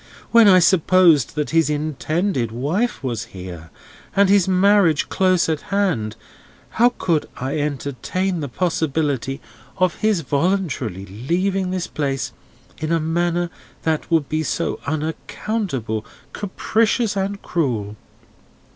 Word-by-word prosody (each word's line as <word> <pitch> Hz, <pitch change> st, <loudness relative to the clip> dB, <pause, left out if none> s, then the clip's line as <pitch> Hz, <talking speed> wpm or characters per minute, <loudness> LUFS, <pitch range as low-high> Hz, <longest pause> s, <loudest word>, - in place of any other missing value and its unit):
When 230 Hz, -2 st, +7 dB
I 185 Hz, -2 st, +8 dB
supposed 175 Hz, -4 st, +4 dB
that 150 Hz, -1 st, -2 dB
his 165 Hz, -1 st, +3 dB
intended 150 Hz, -, -1 dB
wife 155 Hz, -, -1 dB
was 120 Hz, -4 st, -2 dB
here, 90 Hz, -3 st, -9 dB, 0.5 s
and 200 Hz, -1 st, +4 dB
his 195 Hz, -2 st, +4 dB
marriage 190 Hz, -4 st, +3 dB
close 185 Hz, -2 st, +2 dB
at 155 Hz, -2 st, -1 dB
hand, 180 Hz, -, 0 dB, 0.6 s
how 240 Hz, +2 st, +3 dB
could 165 Hz, -4 st, 0 dB
I 135 Hz, +4 st, -2 dB
entertain 150 Hz, +6 st, -2 dB
the 145 Hz, -, -3 dB
possibility 145 Hz, -4 st, -1 dB, 0.4 s
of 185 Hz, -2 st, +1 dB
his 215 Hz, -5 st, +2 dB
voluntarily 140 Hz, -, -1 dB
leaving 180 Hz, -, -1 dB
this 185 Hz, -1 st, -2 dB
place, 135 Hz, -3 st, -2 dB, 0.5 s
in 155 Hz, +1 st, -2 dB
a 165 Hz, -, +3 dB
manner 170 Hz, +2 st, 0 dB, 0.3 s
that 160 Hz, -1 st, -1 dB
would 160 Hz, -4 st, +2 dB
be 155 Hz, 0 st, -1 dB
so 155 Hz, -, -2 dB
unaccountable, 155 Hz, -, -3 dB, 0.3 s
capricious, 215 Hz, +2 st, 0 dB
and 195 Hz, +1 st, -2 dB
cruel? 115 Hz, -, -1 dB
165 Hz, 120 wpm, -21 LUFS, 140-190 Hz, 0.6 s, I